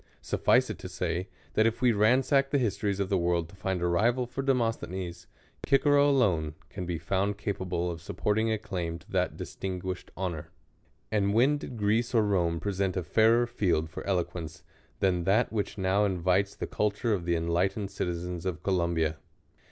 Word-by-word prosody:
SutBce - - +2
it - - -8
to - - -7
say, 90 +3 -2 0.3
that 110 +1 +4
if 115 - -1
we 125 -1 +4
ransack 130 +6 +3
the 145 - +2
histories 100 -5 0
of 100 -1 -1
the 95 -2 +2
world 85 -1 +1
to 100 - -15
find 95 -2 -2
a - - +2
rival 115 +8 +2
for 125 +3 -4
Demosthenes, 115 -9 -1 0.4
Cicero 145 +1 +4
alone 90 - +2
can 90 -3 -6
be 85 -2 -2
found 100 +4 -1
capable 90 -4 -2
of 85 -1 -7
suppoiHing 110 +6 0
a 110 - +1
claim 90 -6 -4
to 85 - -19
that - - 0
distin 95 -1 -5
guished 90 0 -5
honor. 90 -5 -4 0.6
And 100 -1 +1
when 140 +6 +4
did 125 - -7
Greece 110 +4 +1
or 110 -2 +4
Rome 85 -5 +1
present 100 -1 -1
a 90 - -1
fairei\ 115 +7 +4
field 85 -9 0
for - - -6
eloquence 90 -3 -2 0.4
than 90 -3 +2
that 110 +5 +2
which 105 -1 -2
now 95 +1 +2
invites 95 0 +1
the - - -4
culture 105 +2 0
of 90 -4 -2
the 85 -1 +1
enlightened 90 +5 0
citizens 90 -1 -3
of 85 -4 -4
Columbia 85 -4 +1
95 Hz, 180 wpm, -29 LUFS, 85-110 Hz, 0.6 s, that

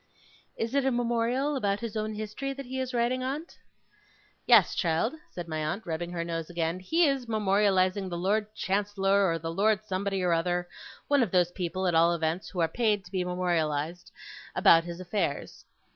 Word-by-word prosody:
'Is 230 +2 -2
it 280 -1 +2
a 265 - +2
Memorial 245 +3 0
about 205 -6 0
his 230 -2 -5
own 215 0 -2
history 215 +6 -4
that 275 0 -8
he 260 +1 -4
is 260 -1 -2
writing, 245 +1 0
aunt?' 285 +6 -5 0.9
'Yes, 230 -7 +6
child,' 165 - 0 0.2
said 175 -1 -7
my 155 -1 -3
aunt, 175 +9 -3
rubbing 170 +1 -3
her 170 -1 -2
nose 165 -1 -4
again. 170 0 -2
'He 330 - +2
is 270 -3 -1
memorializing 195 -3 +2
the 175 - -4
Lord 210 +4 0
Chancellor, 200 0 +1
or 165 - 0
the 165 0 -5
Lord 215 +3 +2
Somebody 195 -1 -2
or 175 -1 +2
other 175 +1 0 0.4
one 285 -2 +3
of 230 - +1
those 175 -1 +2
people, 185 +1 -3
at 180 - +2
all 170 +1 +4
events, 165 +2 -2
who 180 - -3
are 165 - +3
paid 210 +1 0
to 180 - -14
be 185 -2 0
memorialized 175 -2 -1 0.4
about 165 0 +6
his 170 0 -7
affairs. 185 +3 -3
195 Hz, 190 wpm, -28 LUFS, 175-230 Hz, 0.9 s, Yes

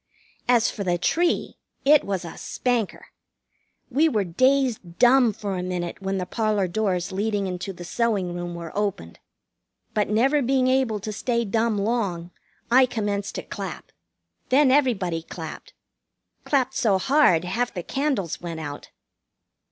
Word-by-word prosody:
As 240 -2 +4
for 205 - -5
the 175 -2 +1
tree, 340 - 0 0.3
it 295 +1 +6
was 190 -3 -3
a 165 - -8
spanker. 240 -5 -2 0.8
We 305 +6 +4
were 215 -8 +1
dazed 240 -2 +1
dumb 245 -1 +5
for 200 -1 -4
a 180 - -2
minute 180 0 -4
when 195 0 -2
the 185 - -2
parlor 215 -2 0
doors 185 -1 -1
leading 205 +1 -1
into 180 +1 -4
the 175 -1 -10
sewing 200 -4 0
room 175 0 -5
were 170 -2 -8
opened. 200 - -3 0.7
But 210 -2 +1
never 265 +8 +3
being 260 0 +2
able 255 -5 +1
to 215 +2 -5
stay 235 +2 -1
dumb 220 +1 +1
long, 200 -5 -1 0.4
I 255 +1 +6
commenced 205 -4 -2
to - - -4
clap. - - -7 0.6
Then 265 +1 +5
everybody 210 - +2
clapped. 165 - -9 0.7
Clapped 270 -3 +1
so 220 -8 +2
hard 255 - +4
half 240 +6 -1
the 175 - -5
candles 270 - -2
went 170 -2 -5
out. 145 -2 -7
210 Hz, 150 wpm, -24 LUFS, 180-250 Hz, 0.8 s, it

